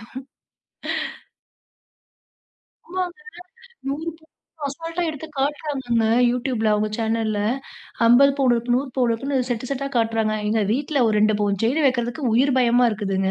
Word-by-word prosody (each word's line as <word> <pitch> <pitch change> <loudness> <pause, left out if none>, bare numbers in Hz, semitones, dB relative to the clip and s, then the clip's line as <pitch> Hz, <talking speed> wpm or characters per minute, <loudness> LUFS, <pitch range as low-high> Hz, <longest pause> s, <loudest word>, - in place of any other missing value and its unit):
ஐயயோ. - - -12 2.8
ஆமாங்க, 360 +1 -4 0.7
100 300 +4 -2
பவுனு 320 0 -27 0.3
அசால்டா 330 +5 -5
எடுத்து 315 +1 -7
காட்டுறாங்கங்க, 270 -5 -1 0.3
YouTubeல 245 -3 -1
அவங்க 210 0 0
சேனல்ல 220 -2 -1 0.7
50 270 +4 +6
பவுனு 255 -3 +4
இருக்கு 240 +1 0
100 270 +1 -3
பவுனு 245 -2 +3
இருக்குன்னு 270 +4 -1
செட் 245 +1 -2
செட்டா 275 0 -2
காட்டுறாங்க. 225 -1 +1
எங்க 215 0 +1
வீட்ல 280 0 0
ஒரு 215 - +1
2 215 0 +3
பவுன் 200 -2 0
செயின் 275 +6 +2
வெக்கிறதுக்கு 245 0 -1
உயிர் 260 +3 +3
பயமா 245 0 +4
இருக்குதுங்க. 195 -3 -1
245 Hz, 130 wpm, -22 LUFS, 225-280 Hz, 2.8 s, 50